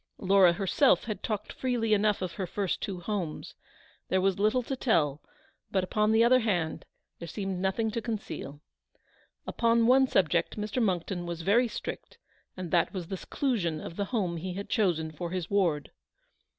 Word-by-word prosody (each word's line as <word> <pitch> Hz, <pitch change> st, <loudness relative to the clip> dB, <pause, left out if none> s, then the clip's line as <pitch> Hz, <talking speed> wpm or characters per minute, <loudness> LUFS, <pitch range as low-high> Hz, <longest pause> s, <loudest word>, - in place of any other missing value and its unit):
Laura 190 Hz, -2 st, +5 dB
herself 200 Hz, +9 st, +3 dB
had 215 Hz, -4 st, -5 dB
talked 210 Hz, -2 st, -3 dB
freely 240 Hz, -4 st, 0 dB
enough 210 Hz, -1 st, +2 dB
of 180 Hz, -, -3 dB
her 190 Hz, 0 st, -4 dB
first 195 Hz, 0 st, -2 dB
two 185 Hz, -3 st, -4 dB
homes. 180 Hz, -5 st, -4 dB, 0.6 s
There 190 Hz, -, +2 dB
was 195 Hz, 0 st, +1 dB
little 215 Hz, +5 st, +2 dB
to 270 Hz, -, -3 dB
tell, 155 Hz, -, +1 dB, 0.5 s
but, 190 Hz, -2 st, +1 dB
upon 210 Hz, +3 st, +1 dB
the 220 Hz, +1 st, +5 dB
other 255 Hz, +2 st, +5 dB
hand, 175 Hz, -8 st, -1 dB, 0.3 s
there 170 Hz, -, -7 dB
seemed 195 Hz, +1 st, -4 dB
nothing 195 Hz, +4 st, 0 dB
to 230 Hz, +1 st, -3 dB
conceal. 210 Hz, -, -5 dB, 0.8 s
Upon 230 Hz, 0 st, +2 dB
one 260 Hz, +2 st, +5 dB
subject 170 Hz, -, +1 dB
Mr. 210 Hz, +4 st, -2 dB
Monckton 180 Hz, -3 st, -1 dB
was 170 Hz, -1 st, -5 dB
very 235 Hz, +7 st, +4 dB
strict, -, -, -7 dB, 0.4 s
and 180 Hz, -3 st, -5 dB
that 175 Hz, +2 st, +2 dB
was 175 Hz, -3 st, -5 dB
the 190 Hz, -, -3 dB
seclusion 185 Hz, -, -1 dB
of 165 Hz, -, -8 dB
the 200 Hz, -, -1 dB
home 195 Hz, -7 st, -1 dB
he 180 Hz, +2 st, -5 dB
had 200 Hz, +1 st, -6 dB
chosen 170 Hz, -8 st, +1 dB
for 170 Hz, +2 st, -5 dB
his 180 Hz, 0 st, -4 dB
ward. 170 Hz, -8 st, +1 dB
195 Hz, 175 wpm, -29 LUFS, 175-220 Hz, 0.8 s, Laura